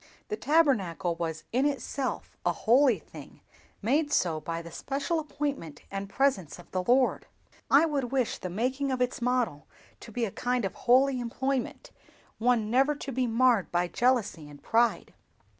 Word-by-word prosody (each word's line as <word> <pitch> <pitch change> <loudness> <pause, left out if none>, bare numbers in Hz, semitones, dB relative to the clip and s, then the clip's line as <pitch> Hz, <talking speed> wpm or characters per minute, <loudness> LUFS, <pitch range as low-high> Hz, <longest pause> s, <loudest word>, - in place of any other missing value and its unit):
The 425 - -1
Tabernacle 255 - +2
was 165 -2 -4
in 260 +4 +2
itself 275 -1 -3
a - - +2
holy 245 0 +4
thing, - - -13 0.4
made 290 +7 +1
so 165 - +1
by 165 +2 -4
the 170 - -10
special 280 - -2
appointment 285 - -4
and 195 0 -4
presence 200 - 0
of 175 -1 -15
the 185 - -1
Lord. 250 +7 +2 0.4
I 285 +4 +6
would 290 -5 -1
wish 260 -4 0
the 185 - -5
making 260 +8 -1
of 260 - -1
its 250 0 -1
model 235 - 0 0.3
to 230 - -11
be 235 +1 -1
a 205 - -5
kind 245 0 -1
of 195 - -3
holy 255 +2 +3
employment, 255 +2 -3 0.5
one 225 -2 +2
never 270 +4 +3
to 280 - -6
be 255 0 0
marred 235 -3 +3
by 175 0 +1
jealousy 220 - 0
and 145 -1 -14
pride. 230 +1 +1
245 Hz, 165 wpm, -28 LUFS, 195-270 Hz, 0.5 s, I